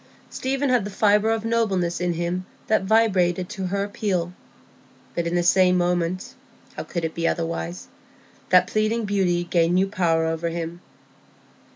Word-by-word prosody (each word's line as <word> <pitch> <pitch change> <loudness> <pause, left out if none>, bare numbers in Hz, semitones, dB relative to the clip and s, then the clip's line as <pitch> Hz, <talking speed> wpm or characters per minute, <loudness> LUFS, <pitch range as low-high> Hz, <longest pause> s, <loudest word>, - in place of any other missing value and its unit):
Stephen 270 +1 -1
had 250 -4 +3
the 205 - -5
fibre 210 +1 +3
of 225 0 -1
nobleness 195 -7 0
in 175 -1 0
him 175 +2 -2 0.2
that 215 - +2
vibrated 190 -5 +2
to 190 -1 -4
her 200 +2 -1
appeal; 190 -4 -2 0.8
but 170 -1 -2
in 170 - -1
the 175 - +2
same 180 +1 +4
moment—how 175 +1 -3
could 170 -2 -3
it 160 - -3
be 165 0 -1
otherwise?—that 170 +1 -2
pleading 215 +1 0
beauty 185 -4 +1
gained 170 0 +1
new 185 +1 +3
power 170 -5 +1
over 165 +1 -1
him. 170 +1 -5
180 Hz, 150 wpm, -23 LUFS, 170-205 Hz, 0.8 s, same